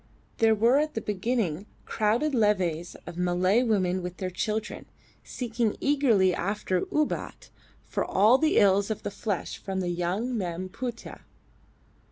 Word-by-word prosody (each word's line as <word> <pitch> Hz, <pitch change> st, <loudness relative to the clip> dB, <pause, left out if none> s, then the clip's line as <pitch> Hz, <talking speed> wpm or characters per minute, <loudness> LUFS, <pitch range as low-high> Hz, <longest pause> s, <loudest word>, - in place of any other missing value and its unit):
There 225 Hz, -1 st, +4 dB
were 235 Hz, +6 st, +4 dB
at 305 Hz, +1 st, -1 dB
the -, -, 0 dB
beginning 205 Hz, -3 st, -2 dB, 0.2 s
crowded 230 Hz, +8 st, 0 dB
levees 185 Hz, -8 st, +1 dB
of 175 Hz, -, -8 dB
Malay 180 Hz, +5 st, +2 dB
women 190 Hz, -6 st, +1 dB
with 180 Hz, +1 st, -6 dB
their 185 Hz, -1 st, -4 dB
children, 215 Hz, +4 st, -3 dB, 0.4 s
seeking 230 Hz, -3 st, -2 dB
eagerly 240 Hz, -11 st, +3 dB
after 185 Hz, -1 st, -1 dB
"Ubat" 305 Hz, -1 st, -2 dB, 0.3 s
for -, -, -2 dB
all 215 Hz, +7 st, +4 dB
the 315 Hz, 0 st, +2 dB
ills 200 Hz, +1 st, +4 dB
of 220 Hz, -, -4 dB
the -, -, -3 dB
flesh 205 Hz, -3 st, -4 dB
from 190 Hz, -1 st, -4 dB
the 180 Hz, -1 st, -1 dB
young 180 Hz, +8 st, -2 dB
Mem 185 Hz, -2 st, -3 dB
Putih. 235 Hz, +3 st, -6 dB
205 Hz, 145 wpm, -27 LUFS, 185-235 Hz, 0.4 s, There